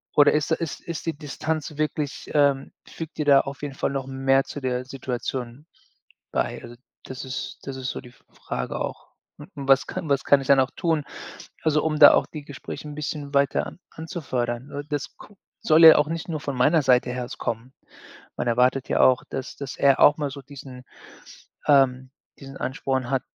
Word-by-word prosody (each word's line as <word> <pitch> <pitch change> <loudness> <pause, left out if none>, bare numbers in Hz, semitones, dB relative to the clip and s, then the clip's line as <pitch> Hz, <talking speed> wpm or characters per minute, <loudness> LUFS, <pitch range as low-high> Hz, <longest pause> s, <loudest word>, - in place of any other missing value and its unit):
oder 145 -1 +7
ist 150 -1 0
ist 160 -1 -2
ist 170 -2 -6
die 165 - -1
Distanz 155 0 -4
wirklich 150 -1 -3
ähm, 140 -2 +2 0.2
fügt 160 -2 -8
die 150 - -1
da 140 -1 +6
auf 135 0 -8
jeden 140 -2 -5
Fall - - -1
noch 135 -1 -3
mehr 135 0 +2
zu - - -7
der 125 -1 -2
Situation 130 0 -5 0.7
bei, - - -2
also, 120 - -10 0.3
das 130 0 -7
ist 130 +1 -5
das 135 -1 -6
ist 130 -1 -4
so - - -5
die 125 - -13
F - - -26
Frage - - -5
auch. - - -6 0.3
Und - - -12 0.2
was 135 -1 +5
kann 185 -4 -5
was 140 -1 +1
kann 140 - +5
ich - - -8
denn 140 -1 +6
auch 130 0 +1
tun, 160 -5 0 0.6
also, 155 -1 +2
um 155 -1 0
da 145 -1 +9
auch - - +3
die 150 -2 -9
Gespräche 145 +2 -8
'n 150 - -7
bisschen 150 -1 -5
weiter 140 -1 +1 0.2
anzufördern 135 -7 -4
n 145 0 -6
das 145 -2 -4
guck 205 -2 -16 0.3
soll 160 +1 +6
ja 160 - +11
auch 150 0 +2
nicht 165 +2 -4
nur 155 -3 -3
von 140 -3 -4
meiner 150 +6 +4
Seite 125 -2 +3
her 125 -1 -4
so - - -8
kommen. 120 +2 -4 0.6
Man - - -3
erwartet 125 +3 +2
ja - - +1
auch, 130 -1 +5
dass 135 0 -5
dass 140 -2 -7
er 140 -1 +4
auch 145 - +7
mal 145 -2 -2
so 140 +1 -9
diesen 135 -2 -11 0.8
ähm, 130 -2 +3 0.3
diesen 135 0 -11
Ansporn 130 -1 -2
hat, 135 -2 +1
140 Hz, 200 wpm, -24 LUFS, 130-150 Hz, 0.8 s, ja